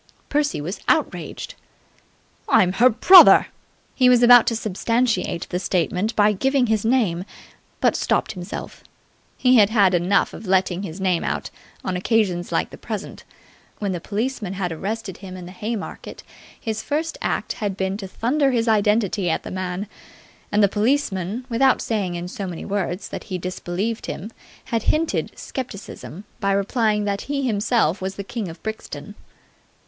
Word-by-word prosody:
Percy 290 - 0
was 170 +7 -5
outraged. - - -1 1.0
"I'm 180 0 +4
her 245 +6 +5
brother!" 360 - +8 0.4
He 255 -2 +4
was 245 -1 +5
about 245 -1 +8
to 230 - +1
substantiate 225 -3 -1
the 180 - -2
statement 185 +4 -1
by 210 0 +4
giving 265 +5 +2
his 220 -3 0
name, 220 -8 +1 0.6
but - - +3
stopped - - 0
himself. 180 -1 -7 0.5
He 255 -1 +4
had 205 -2 +6
had 200 -5 +4
enough 180 +3 +2
of 220 - -9
letting 185 -1 +1
his 185 -2 -7
name 185 -3 +1
come - - -1
out - - -5 0.3
on 185 - -1
occasions 185 -2 0
like - - 0
the - - -11
present. - - -6 0.5
When 200 -2 -2
the 175 -2 -4
policeman 215 -1 -3
had 185 -3 -3
arrested 195 +3 -4
him 185 -1 -9
in 180 - -8
the 180 - -9
Haymarket, 220 +1 -6 0.4
his 220 -2 -3
first 315 +2 -2
act - - -1
had 200 -2 -2
been 190 0 -1
to 195 -2 -6
thunder 270 +9 +1
his 235 -2 0
identity 210 -3 +2
at 160 - -1
the - - -7
man: 185 +1 -3 0.7
and 210 0 +3
the - - +7
policeman, 215 -1 -1
without 260 +2 +3
saying 200 -6 -2
in 175 +1 -4
so 195 +2 -5
many 175 -2 -6
words 195 -2 -3
that - - -7
he 185 -4 -4
disbelieved 185 +5 -4
him, 210 +6 -6 0.3
had 230 -3 -1
hinted 320 +1 0
scepticism 205 - -7 0.2
by 200 -2 +1
replying 210 +1 +1
that 200 -1 -1
he 280 -1 -1
himself 210 -5 +1
was 190 +1 -3
the 200 - -5
king 215 0 -5
of 165 - -12
Brixton. 220 0 -6
205 Hz, 165 wpm, -22 LUFS, 185-230 Hz, 1.0 s, brother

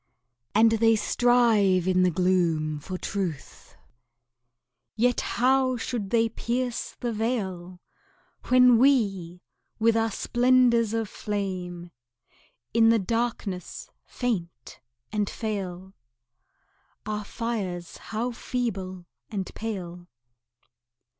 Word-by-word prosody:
And 225 +1 +6
they 225 0 +4
strive 215 -6 +3
in 185 0 +3
the 185 - +4
gloom 170 -4 +1
for 185 +5 -6
truth 180 -8 -5 1.2
Yet 245 +2 +2
how 255 +1 +2
should 225 -4 -4
they 230 +1 +3
pierce 240 +2 -3
the 240 -1 -2
veil, 190 -6 -3 0.7
When 250 -2 +6
we, 195 -10 +2 0.3
with 225 0 +3
our 225 0 +2
splendors 240 0 +3
of 225 -1 -1
flame, 185 -5 -4 0.8
In 225 0 +5
the 230 - +5
darkness 215 -3 -3
faint 170 - -4 0.3
and 210 -2 -1
fail, 190 -4 -5 1.1
Our 210 0 -3
fires 200 -6 -4
how 230 +3 -3
feeble 195 -7 -4 0.2
and 195 -4 -4
pale! 180 -5 -6
215 Hz, 95 wpm, -26 LUFS, 185-235 Hz, 1.2 s, And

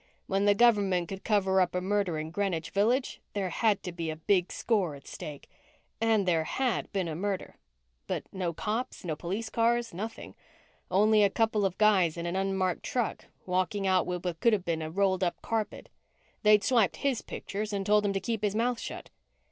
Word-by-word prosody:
When 195 +1 0
the 205 0 +5
government 200 -6 +3
could 195 0 -6
cover 190 -3 +3
up 180 0 0
a - - +2
murder 190 -3 0
in 155 +1 -4
Greenwich 175 -4 -2
Village, 235 +6 +1
there 195 -3 -2
had 210 +1 +1
to 180 - -4
be 170 -2 -4
a 155 - -3
big 180 +3 +1
score 195 -10 0
at 140 - -14
stake. 145 -2 -8 0.5
And 220 -4 +2
there 165 -3 +3
had 255 +6 -1
been 190 -3 -1
a 160 - -4
murder 195 +2 -3 0.5
but - - -2
no 185 -3 -1
cops, 215 +6 -3
no 160 -3 -2
police 200 +8 -4
cars, 235 -1 +1
nothing. 220 +6 -6 0.6
Only 210 +3 +4
a 200 - +5
couple 220 0 +1
of 185 - -8
guys 190 -6 +4
in 170 - -4
an 175 +1 -2
unmarked 190 -2 0
truck 245 -3 -2 0.2
walking 185 +2 0
out 185 -1 +2
with 180 0 -3
what 170 -2 -2
could 235 - +4
have 195 -4 0
been 165 -1 -1
a 155 - -4
rolled 190 +2 +1
up 175 - -1
carpet. 220 -2 -3 0.5
They'd 210 -1 +5
swiped 230 -6 +3
his 275 -4 -1
pictures 210 +2 -5
and 200 -1 -2
told 210 +1 +4
him 200 -1 +1
to 195 - 0
keep 220 +2 -3
his 210 -1 0
mouth 235 +1 +1
shut. - - -7
195 Hz, 200 wpm, -29 LUFS, 180-215 Hz, 0.6 s, the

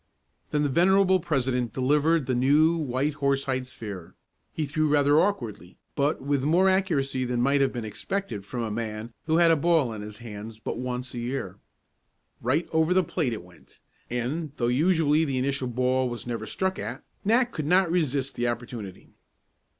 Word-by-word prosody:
Then 150 0 +1
the 145 - +1
venerable 190 +5 +4
president 130 -7 -1
delivered 150 +4 +2
the 130 - -1
new, 145 +6 +4
white 145 -1 -1
horsehide 135 -2 -1
sphere. 100 -8 -8 0.4
He 155 - -2
threw 155 +2 0
rather 145 0 +4
awkwardly, 110 - -3 0.2
but 145 +2 +1
with 140 -1 +1
more 170 +6 +4
accuracy 160 -9 +1
than 125 -1 -1
might 140 +3 +3
have 135 - +2
been 120 -3 -5
expected 110 - -4
from 120 +4 -4
a 110 - -3
man 110 +1 -4
who 160 0 +3
had 170 -1 +6
a - - +5
ball 155 -6 +2
in 105 - -6
his 105 0 -8
hands 110 -1 -8
but 115 - -4
once 125 0 -4
a 120 - -4
year. 120 -6 -4 0.8
Right 140 +8 +1
over 160 +3 +3
the 185 - +4
plate 155 -5 -1
it 110 -6 -5
went, 90 -1 -18 0.3
and 135 +6 -3
though 120 -1 +1
usually 155 +2 +3
the 135 -4 -1
initial 135 0 -1
ball 125 +1 +1
was 120 -3 -6
never 115 -2 -4
struck 190 - -2
at, 115 +7 -5 0.2
Nat 235 +4 +3
could 150 -2 -4
not 180 0 +4
resist 140 -6 0
the 120 - -1
opportunity. 120 -5 -6
135 Hz, 180 wpm, -26 LUFS, 120-160 Hz, 0.8 s, had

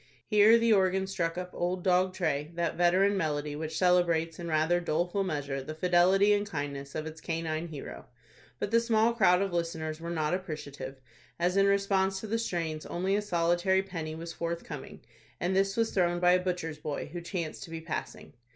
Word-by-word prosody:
Here 210 +1 +6
the 230 -1 +3
organ 190 -1 +2
struck 170 -3 -2
up 180 0 -5
"Old 180 +1 -2
Dog 185 0 +3
Tray," 150 -5 -1
that 170 0 -1
veteran 185 +3 +3
melody, 150 -4 -1
which 155 +1 -4
celebrates, 170 -2 +2
in 170 - -5
rather 160 +2 +2
doleful 175 +4 0
measure, 145 -6 -3
the 155 +4 -7
fidelity 180 +4 +4
and 205 0 0
kindness 140 -4 -5
of 155 - -3
its 160 0 -8
canine 165 0 -3
hero. 150 -4 -8 0.5
But 200 - -3
the 230 - +5
small 230 0 +2
crowd 190 -4 +4
of 195 -3 -3
listeners 160 -2 -3
were 170 - -5
not 155 -2 -1
appreciative, 145 -7 -5 0.4
as 175 +2 +1
in 195 0 +4
response 195 -1 +2
to - - -6
the 225 +2 -1
strains 165 -8 -3
only 190 +3 0
a 210 - +1
solitary 175 0 +1
penny 165 -5 -5
was 165 +1 -7
forthcoming, 170 +1 -5 0.4
and 180 +2 0
this 195 +1 +1
was 225 -1 +1
thrown 175 -2 +1
by 180 0 +5
a 180 - +5
butcher's 170 -4 -3
boy, 150 0 -5
who 175 - -4
chanced 170 -2 -4
to - - -14
be 165 0 -5
passing. 160 -2 -6
175 Hz, 190 wpm, -29 LUFS, 160-190 Hz, 0.5 s, Here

